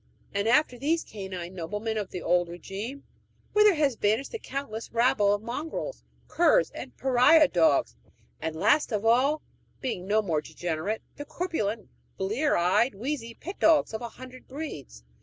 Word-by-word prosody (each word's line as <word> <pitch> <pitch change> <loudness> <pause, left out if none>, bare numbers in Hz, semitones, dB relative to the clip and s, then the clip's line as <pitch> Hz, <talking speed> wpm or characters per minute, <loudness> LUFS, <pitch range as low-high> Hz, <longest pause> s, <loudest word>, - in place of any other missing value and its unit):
And 200 +2 0
after 245 0 +3
these 320 +5 +1
canine 190 -4 -7
noblemen 210 +6 -3
of 205 -3 -3
the 180 - -6
old 175 0 +2
regime, 200 - -7 0.5
whither 420 -2 +6
has 290 -4 +2
vanished 220 +4 0
the 455 - -5
countless 255 - -6
rabble 230 -4 +3
of 205 +1 0
mongrels, 310 - -5 0.2
curs, 350 +9 +3
and - - -9
pariah 270 +4 +5
dogs; 160 - +2 0.5
and 160 - -3
last 295 - +3
of 210 0 -1
all 265 +7 +3 0.4
being 190 -9 -4
more 200 -7 +1
degenerate 175 +7 -3
the 290 - -6
corpulent, 230 - -3 0.3
blear 220 +11 +1
eyed, 200 +8 +2
wheezy 235 0 -4
pet 370 +5 -8
dogs 315 -7 +4
of 220 - -4
a 235 - -5
hundred 255 +2 -12
breeds? 155 - -7
225 Hz, 155 wpm, -27 LUFS, 195-280 Hz, 0.5 s, whither